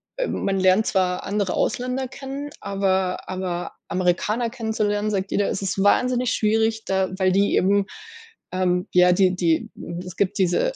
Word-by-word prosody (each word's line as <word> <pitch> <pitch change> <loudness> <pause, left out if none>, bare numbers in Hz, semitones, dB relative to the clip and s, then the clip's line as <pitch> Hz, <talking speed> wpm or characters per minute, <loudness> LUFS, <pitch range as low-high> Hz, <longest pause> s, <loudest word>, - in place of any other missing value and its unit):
äh, - - -1
man 195 0 -1
lernt 190 +3 +4
zwar 180 -1 0
andere 200 -2 -1
Ausländer 255 +1 -1
kennen, 275 +2 -7
aber 190 -2 -1
aber 185 -2 -4 0.2
Amerikaner 205 +6 0
kennenzulernen, 215 -3 -1
sagt 195 -1 -2
jeder: 205 - +1
„Es 195 - -3
ist 195 0 -1
wahnsinnig 250 +3 +2
schwierig”, 220 +1 +1
da 190 -1 0
weil 185 -1 +2
die 200 +1 +2
eben 200 +1 +3 0.7
ähm, 180 +1 0
ja, 180 0 +6
die 185 0 +3
die 170 -3 +1 0.4
es 180 - -8
gibt 195 -2 0
diese 185 - +2
195 Hz, 155 wpm, -23 LUFS, 185-220 Hz, 0.7 s, ja